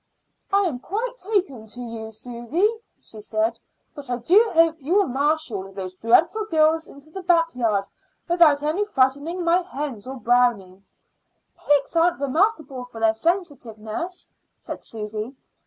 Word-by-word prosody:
"I 400 +1 +4
am 310 -10 -2
quite 455 - -3
taking 365 - -2
to 235 +3 -10
you, 230 -2 -6
Susy," 240 - -1 0.3
she 215 - -10
said. 220 +2 -1 0.3
"But 285 -4 -10
I 245 - -1
do 385 - +4
hope 330 -1 +4
you 310 +8 0
will 405 -1 +5
marshal 265 - -1
those 190 -1 -6
dreadful 330 - +2
girls 320 -3 +2
into 280 +3 -15
the 385 - -6
backyard 290 - +2 0.4
without 330 -5 +4 0.3
frightening 285 +5 +1
my 340 +2 +3
hens 280 - -6
or 265 - -5
Brownie." 235 -6 +1 0.7
"Pigs 290 +2 +1
aren't 340 0 +3
remarkable 280 - 0
for 225 -2 0
sensitiveness," 290 - -3 0.3
said - - -8
Susy. 215 +3 -6
275 Hz, 135 wpm, -23 LUFS, 230-340 Hz, 0.7 s, will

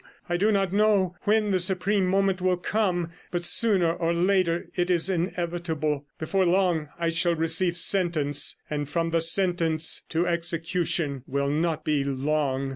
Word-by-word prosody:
I 175 - -1
do 205 +5 +2
not 195 -2 0
know 200 -4 +2
when 210 0 +2
the 185 - +2
supreme 190 +2 +1
moment 195 0 +1
will 185 -1 +1
come, 180 -3 -1 0.2
but 175 -1 -3
sooner 185 -6 +2
or 170 0 -1
later 180 -1 +1
it 175 0 -1
is 180 +1 +3
inevitable; 170 -4 -2
before 190 +4 0
long 175 -4 +1
I 170 -1 -1
shall 170 +1 +1
receive 165 +2 +1
sentence, 170 -7 +1
and 145 -1 -4
from 165 +2 -1
the 165 0 +1
sentence 165 -2 +2
to 165 +2 0
execution 170 -4 -1
will 140 +1 -1
not 160 +1 -1
be 150 -2 +1
long. 140 0 -1
170 Hz, 155 wpm, -25 LUFS, 160-185 Hz, 0.2 s, is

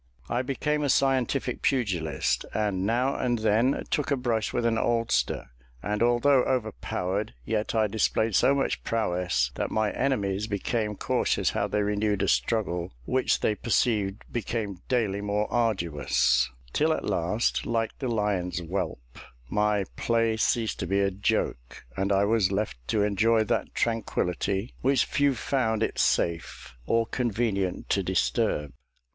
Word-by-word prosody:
I 120 - +1
became 150 +3 -1
a 145 - 0
scientific 130 -1 +1
pugilist, 95 - 0
and 100 -3 0
now 125 +4 +1
and 120 -1 0
then 110 +5 +2
took 150 - 0
a 140 - +2
brush 115 -4 -1
with 120 - -1
an 115 -1 +2
oldster; 115 - 0 0.3
and 105 +1 -2
although 120 +3 +4
overpowered, 110 -4 -2
yet 110 0 -1
I 110 -1 +3
displayed 110 +1 +1
so 140 - +4
much 140 - -1
prowess, 90 - 0
that - - -2
my 110 -1 0
enemies 105 -6 -1
became 105 +1 -2
cautious - - 0
how - - -1
they 105 - 0
renewed 105 -1 0
a - - +1
struggle 90 -7 0
which 130 0 +1
they 110 - +2
perceived 105 -2 0
became 110 -4 -3
daily 110 -6 +1
more 105 +1 0
arduous; 75 - +2 0.2
till - - +2
at - - -3
last, 105 +8 0
like 115 -1 -1
the 130 - -2
lion's 100 -6 -1
whelp, 85 -9 -4 0.3
my 105 -1 +2
play 115 -1 +1
ceased 110 0 0
to 90 - -2
be 100 +2 +1
a 100 0 +2
joke, 90 -10 -2
and 100 +1 -1
I 100 +1 +3
was 105 -3 +2
left 100 - -2
to 105 -2 +1
enjoy 110 +2 +3
that 110 - -2
tranquillity, 100 -2 -1
which 135 -1 +3
few 145 -4 +1
found 115 -4 0
it - - -2
safe 85 -5 0
or 115 0 +2
convenient 110 -6 -1
to 100 - +2
disturb. 85 -5 0
110 Hz, 150 wpm, -27 LUFS, 95-120 Hz, 0.3 s, although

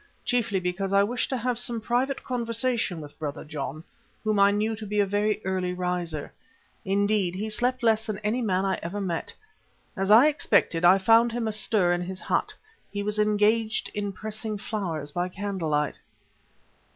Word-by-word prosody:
Chiefly 235 -6 +1
because 185 +2 -2
I 200 0 +5
wished 245 +4 -1
to 260 - -1
have 245 0 -1
some 240 -1 -1
private 245 +5 -1
conversation 230 -6 -1
with 145 -1 -12
Brother 150 -2 -5
John, 150 0 -5 0.4
whom 215 -2 +1
I 200 0 +7
knew 215 +2 0
to 215 -1 -7
be 210 +1 -1
a 205 - +4
very 205 +2 0
early 185 -1 -1
riser. 180 -4 -3 0.5
Indeed, 200 -2 +1
he 215 +3 -3
slept 250 +3 0
less 220 -1 +2
than 215 -2 -2
any 220 +4 0
man 190 -4 +1
I 190 -1 0
ever 185 +5 -4
met. 175 -4 -2 0.6
As 195 0 -1
I 225 +6 +8
expected, 205 - +2
I 180 +2 +7
found 225 +4 +5
him 235 -1 -1
astir 210 -4 +2
in 175 - -1
his 185 +1 -5
hut; - - 0 0.4
he 205 0 -3
was 210 +1 -1
engaged 215 +2 +2
in 205 -1 -2
pressing 215 +2 -5
flowers 180 -8 -4
by 175 +3 -2
candlelight. 170 -7 -2
205 Hz, 175 wpm, -26 LUFS, 180-225 Hz, 0.6 s, I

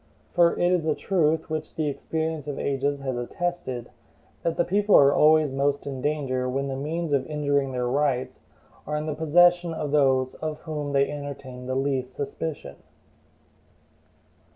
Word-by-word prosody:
For 170 -1 +5
it 175 0 +2
is 175 -3 +1
a 155 - +2
truth, 160 -4 +1
which 155 -1 -5
the 155 -2 -1
experience 160 +1 -3
of 145 - -4
ages 140 +1 -1
has 130 -2 -2
attested, 130 -1 -4 0.5
that 165 -1 -1
the 175 - +2
people 205 +2 +3
are 140 0 +7
always 155 -1 +5
most 140 +1 0
in 135 -2 -5
danger 130 -3 -1
when 135 +2 -2
the 135 - -3
means 155 +3 -3
of 135 -2 +2
injuring 145 -3 0
their 125 -1 -2
rights 135 -1 0 0.5
are 150 - -2
in 150 0 -2
the 155 - -2
possession 175 +2 +4
of 150 -2 -3
those 130 -3 +3
of 155 -1 -4
whom 150 -3 -4
they 140 0 +3
entertain 140 -3 -7
the 130 - -2
least 130 -2 -1
suspicion. 145 - -5
145 Hz, 165 wpm, -25 LUFS, 135-160 Hz, 0.5 s, are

